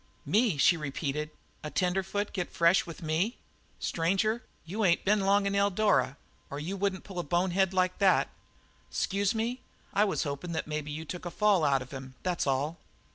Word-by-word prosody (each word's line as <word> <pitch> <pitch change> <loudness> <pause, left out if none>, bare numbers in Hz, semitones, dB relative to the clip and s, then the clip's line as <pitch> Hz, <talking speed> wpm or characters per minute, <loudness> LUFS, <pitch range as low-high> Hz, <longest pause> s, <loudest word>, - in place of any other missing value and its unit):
"Me?" 215 -6 +2
she 175 +6 +5
repeated. 150 0 -3 0.3
"A 150 - -4
tenderfoot 190 +4 -1
get 180 -3 -3
fresh 170 +2 +3
with 165 0 -9
me? 165 +9 0 0.4
Stranger, 195 +7 +1 0.2
you 205 +7 -2
ain't 170 -3 +3
been 210 +2 +4
long 200 +1 +3
in 200 - 0
Eldara 200 -7 +2 0.3
or 140 - -5
you 175 +6 -3
wouldn't 195 -1 -1
pull 190 -3 -6
a - - -1
bonehead 180 +4 +1
like 185 -1 +1
that." 195 -2 +4 0.6
"'Scuse 200 +2 0
me. 235 +3 -2 0.3
I 205 +2 +4
was 200 - 0
hopin' 145 +3 -4
that 160 - -2
maybe 150 -1 -4
you 155 +2 -5
took 180 +3 -6
a - - -2
fall 200 -2 +3
out 135 -3 +3
of 130 - -16
him, 135 -1 -8
that's 180 -4 -1
all." 145 +5 0
180 Hz, 185 wpm, -30 LUFS, 155-200 Hz, 0.6 s, she